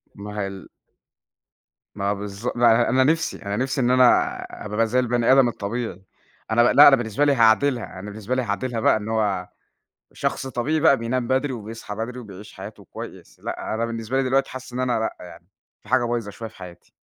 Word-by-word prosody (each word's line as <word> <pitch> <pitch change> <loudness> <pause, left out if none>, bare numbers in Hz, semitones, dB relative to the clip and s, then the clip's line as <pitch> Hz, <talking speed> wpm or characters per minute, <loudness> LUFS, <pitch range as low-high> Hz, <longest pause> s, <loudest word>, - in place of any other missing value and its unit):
ما 105 +1 -7
هي 100 - -1
ال 95 -1 -10 1.3
ما 100 0 0
بالض 100 +3 -6
ما 120 -1 +5
أنا 120 +1 +2
أنا 130 +1 +4
نفْسي 160 +3 +1
أنا 100 +1 -2
نفْسي 135 +1 -1
إن 125 - +2
أنا 125 -1 +4 0.3
اب 105 - -7
ابقى 115 +1 +2
زي 125 +3 +1
البَني 120 -1 +2
آدم 130 -2 +6
الطبيعي، 110 -2 -4 0.5
أنا 120 +2 +5
ما - - +4
لأ 145 - +9
أنا 140 - +8
بالنسبة 120 +2 0
لي 145 - +4
هاعدلها، 115 -2 +2
أنا 105 - -7
بالنسبة 110 +4 -4
لي 130 - +1
هاعدلها 115 +2 -2
بقى 110 - +4
إن 105 +1 -6
هو 105 -5 0 0.7
شخص - - -2
طبيعي 135 +5 -1
بقى 150 -3 +5
بينام 120 +1 -2
بدري، 130 +1 +1
وبيصحى 110 -2 -7
بدري 115 +4 -5
وبيعيش 105 -3 -11
حياته 100 +3 -10
كويس، - - -11
لأ - - -4
أنا 115 - -1
بالنسبة 115 +2 -4
لي 135 - +3
دلوقتي 135 +1 +1
حاسس 130 -1 -9
إن 125 - -3
أنا 125 -2 +1
لأ 110 - -2
يعني، 85 0 -14 0.4
في - - -19
حاجة 130 -1 +3
بايظة 120 -3 -2
شوية 115 +3 -8
في - - -20
حياتي. 90 -1 -12
115 Hz, 210 wpm, -23 LUFS, 105-130 Hz, 1.3 s, لأ